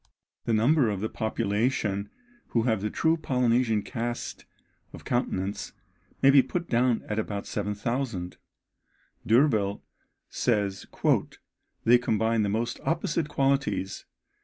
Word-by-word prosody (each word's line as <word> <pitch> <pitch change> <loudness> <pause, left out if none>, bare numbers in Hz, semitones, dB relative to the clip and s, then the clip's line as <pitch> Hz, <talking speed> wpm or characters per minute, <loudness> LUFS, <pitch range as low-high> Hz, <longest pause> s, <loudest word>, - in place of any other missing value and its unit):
The 115 - +1
number 120 +3 +4
of 100 -2 -2
the 110 +2 -2
population 105 -1 -1 0.4
who 115 - +1
have 110 -4 +1
the 105 - -1
true 160 +8 +1
Polynesian 125 -6 +1
cast 120 -1 -4 0.5
of - - -11
countenance 100 -5 -2 0.5
may 135 - +8
be 135 -1 +7
put 175 +5 -4
down 120 -1 +2
at 105 +1 -1
about 105 -2 -3
7000. 105 -1 -3 0.9
D'Urville 110 -5 +3 0.4
says 100 -5 -1 1.0
"they 120 +1 +6
combine 110 -1 +1
the 105 - +1
most 115 +3 -2
opposite 165 -1 -1
qualities. 135 -10 0
115 Hz, 115 wpm, -27 LUFS, 105-130 Hz, 1.0 s, may